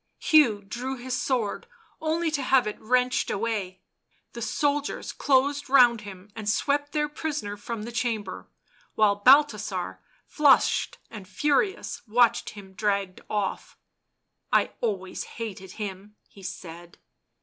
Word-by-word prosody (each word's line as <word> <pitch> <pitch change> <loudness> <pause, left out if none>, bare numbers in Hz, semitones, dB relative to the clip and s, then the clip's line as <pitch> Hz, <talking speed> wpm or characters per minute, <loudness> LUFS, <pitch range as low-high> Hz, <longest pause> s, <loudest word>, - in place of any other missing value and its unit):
Hugh 245 -11 +4
drew 245 +6 -4
his 250 +1 -4
sword, 250 - -1 0.3
only 320 +1 0
to 290 -2 -1
have 260 -1 +3
it 210 - -5
wrenched 250 +2 +1
away. 200 -4 -2 0.5
The 235 - -7
soldiers 285 +5 -1
closed 280 +1 +1
round 245 -4 +6
him 200 -1 -11
and 215 -2 -3
swept 285 +6 0
their 300 -1 0
prisoner 295 -8 -4
from 210 +1 -6
the 235 - -6
chamber, 225 -5 -3 0.5
while 205 -2 +3
Balthasar, 215 -6 +3 0.3
flushed 290 -3 +3
and 210 -4 -9
furious, 295 - 0
watched 235 +1 +3
him 195 -2 -12
dragged 200 -2 -1
off. 205 -2 -3 0.3
" - - -53 0.3
I - - +3
always 195 -5 -3
hated 195 -5 -6
him," 205 0 -7
he 200 - -16
said. 175 -2 -9
225 Hz, 130 wpm, -26 LUFS, 205-270 Hz, 0.5 s, round